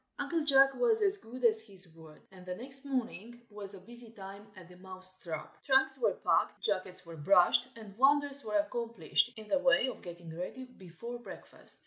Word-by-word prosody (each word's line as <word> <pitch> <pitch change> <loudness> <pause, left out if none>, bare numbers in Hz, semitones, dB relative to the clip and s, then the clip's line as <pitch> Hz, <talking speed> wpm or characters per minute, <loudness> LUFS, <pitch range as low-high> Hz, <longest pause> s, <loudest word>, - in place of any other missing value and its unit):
UNCLE 330 -3 -1
JACK 270 -1 +6
was 455 - +2
as 400 0 +3
good 250 -1 -6
as 220 -1 +4
his 195 -6 +1
word, 160 -1 -15
and 185 -1 -14
the 180 0 -5
next 265 +5 -7
morning 240 -3 -4
was 205 -1 -9
a - - -11
busy 235 +4 -13
time 200 -1 -11
at 185 -3 -13
the 180 - -15
Mouse 185 0 -9
trap. 160 -3 -7
Trunks 265 -1 +3
were - - +1
packed, - - +1
jackets 185 -3 -2
were 165 -1 -10
brushed, 180 +8 +4
and 215 -3 -11
wonders 280 0 +4
were 210 -1 0
accomplished 235 +3 0
in 215 -1 -10
the 285 - +2
way 265 -2 +4
of - - -9
getting 170 -2 -9
ready 185 +9 -6
before 235 +1 -10
breakfast. 240 - -13
220 Hz, 190 wpm, -32 LUFS, 185-265 Hz, -, JACK